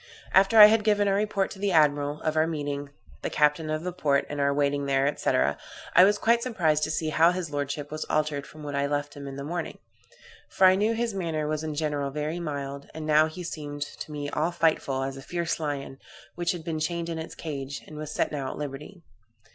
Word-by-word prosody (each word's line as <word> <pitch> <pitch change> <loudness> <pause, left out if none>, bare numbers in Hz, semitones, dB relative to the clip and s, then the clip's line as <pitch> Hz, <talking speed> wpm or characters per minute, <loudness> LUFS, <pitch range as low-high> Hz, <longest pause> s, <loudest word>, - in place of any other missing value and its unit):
After 195 +3 +5
I 210 - +13
had 215 +1 +4
given 205 -1 +3
our 195 - +3
report 200 -1 0
to 195 - -9
the 200 0 0
admiral, 145 -2 +2
of 155 - -1
our 155 0 +3
meeting 145 -3 -3 0.3
the - - -2
captain 150 +1 +2
of 155 +1 -2
the 180 0 -3
port, 145 -6 +1
and 145 -1 -3
our 140 0 +3
waiting 140 0 0
there, 135 +1 +2
&c., - - -1
I - - +2
was 205 +2 +4
quite 230 +2 +3
surprised 170 -12 +1
to - - -5
see 155 0 -1
how 160 +3 +5
his 180 -3 -3
lordship 145 0 -3
was 155 0 -3
altered 150 -2 -1
from 155 0 -12
what 145 -1 -5
I 140 0 0
left 145 0 -2
him 140 -1 -8
in 135 - -7
the 140 - -6
morning; 170 +4 -4 0.7
for 190 - +3
I 185 - +8
knew 210 +4 +1
his 230 -1 -1
manner 165 -5 -2
was 155 0 -2
in 155 -1 -4
general 145 -2 -1
very 150 +4 -3
mild, 140 -3 -5
and 160 -1 -5
now 155 0 +5
he 180 +3 -8
seemed 145 -3 -5
to 150 - -9
me 145 -1 -4
all 160 +3 0
fightful, 155 -5 +1
as 135 0 -6
a - - -8
fierce 170 +4 -2
lion, 140 -3 -4 0.3
which 175 +1 -1
had 170 -2 -7
been 160 -1 -3
chained 170 +2 -2
in 165 -1 -4
its 160 - -7
cage, 140 -3 -6
and 155 - -11
was 150 0 -6
set 155 - -1
at 135 -3 -4
liberty. 150 +5 -7
155 Hz, 230 wpm, -27 LUFS, 145-170 Hz, 0.7 s, I